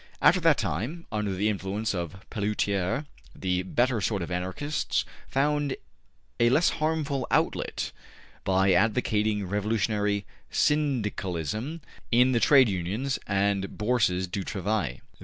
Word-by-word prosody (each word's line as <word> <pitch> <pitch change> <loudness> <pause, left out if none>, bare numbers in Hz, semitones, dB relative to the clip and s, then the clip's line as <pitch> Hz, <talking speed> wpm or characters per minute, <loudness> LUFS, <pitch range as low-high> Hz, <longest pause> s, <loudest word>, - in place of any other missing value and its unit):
After - - +5
that - - +4
time, 150 - -3
under 105 -2 -1
the 100 +3 +1
influence 100 +1 -1
of 85 +1 -5
Pelloutier, 105 +3 0 0.3
the 90 -1 0
better 120 +5 +1
sort 100 0 0
of 85 - -6
Anarchists 95 +12 -1 0.2
found 145 0 +1 0.6
a 120 0 +5
less 155 +7 +4
harmful 155 -4 0
outlet - - 0 0.5
by 95 0 +3
advocating 105 0 +2
Revolutionary 105 0 0 0.2
Syndicalism 115 - -1 0.3
in 125 +2 +5
the 120 - +3
Trade 135 0 +6
Unions 105 +8 -2
and 100 0 0
Bourses 105 -5 +1
du 95 +2 -4
Travail. 95 - -2
105 Hz, 120 wpm, -27 LUFS, 95-125 Hz, 0.6 s, Trade